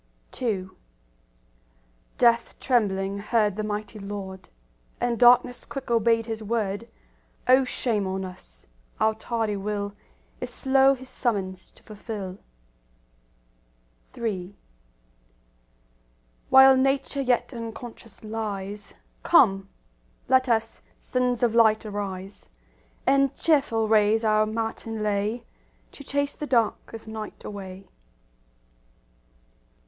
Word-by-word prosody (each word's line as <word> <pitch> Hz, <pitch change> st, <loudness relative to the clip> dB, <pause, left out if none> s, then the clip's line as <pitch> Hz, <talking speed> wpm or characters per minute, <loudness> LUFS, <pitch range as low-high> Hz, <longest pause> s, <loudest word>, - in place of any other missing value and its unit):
II 195 Hz, -6 st, -1 dB, 1.5 s
Death 235 Hz, -1 st, +3 dB
trembling 200 Hz, -5 st, 0 dB
heard 210 Hz, -1 st, +1 dB
the 215 Hz, -, -2 dB
mighty 210 Hz, +1 st, -4 dB
Lord, 195 Hz, -2 st, -7 dB, 0.5 s
And 240 Hz, -1 st, -1 dB
darkness 245 Hz, 0 st, +5 dB
quick 270 Hz, -3 st, -7 dB
obeyed 230 Hz, 0 st, +3 dB
His 225 Hz, -1 st, -4 dB
word;— 215 Hz, 0 st, -2 dB, 0.6 s
O 260 Hz, +1 st, +6 dB
shame 225 Hz, -5 st, -1 dB
on 190 Hz, 0 st, -3 dB
us! -, -, -11 dB, 0.3 s
our 220 Hz, 0 st, +3 dB
tardy 220 Hz, -1 st, -2 dB
will 205 Hz, 0 st, -3 dB, 0.5 s
Is -, -, -5 dB
slow 270 Hz, 0 st, +3 dB
His 260 Hz, 0 st, -12 dB
summons 195 Hz, -8 st, -2 dB
to -, -, -21 dB
fulfil. 205 Hz, -3 st, -7 dB, 1.8 s
III 200 Hz, -4 st, -3 dB, 1.9 s
While 265 Hz, 0 st, +8 dB
Nature 275 Hz, +1 st, +1 dB
yet 255 Hz, 0 st, +1 dB
unconscious 230 Hz, -2 st, -9 dB
lies, 210 Hz, -2 st, -5 dB, 0.3 s
Come, 195 Hz, -, +4 dB, 0.6 s
let 260 Hz, 0 st, +3 dB
us, 225 Hz, -1 st, 0 dB, 0.2 s
sons 250 Hz, -1 st, -1 dB
of 235 Hz, -2 st, +3 dB
light, 220 Hz, -2 st, +4 dB
arise, 200 Hz, -, -6 dB, 0.6 s
And 275 Hz, -1 st, +3 dB
cheerful 270 Hz, -9 st, +2 dB
raise 215 Hz, +1 st, +3 dB
our 215 Hz, 0 st, +3 dB
matin 225 Hz, 0 st, -3 dB
lay 210 Hz, +3 st, -1 dB, 0.5 s
To 280 Hz, -, -11 dB
chase 285 Hz, +1 st, -1 dB
the 300 Hz, -, -6 dB
dark 230 Hz, -5 st, +1 dB
of 225 Hz, -, -9 dB
night 220 Hz, -1 st, -7 dB
away. 195 Hz, -2 st, -8 dB
220 Hz, 105 wpm, -25 LUFS, 205-245 Hz, 1.9 s, While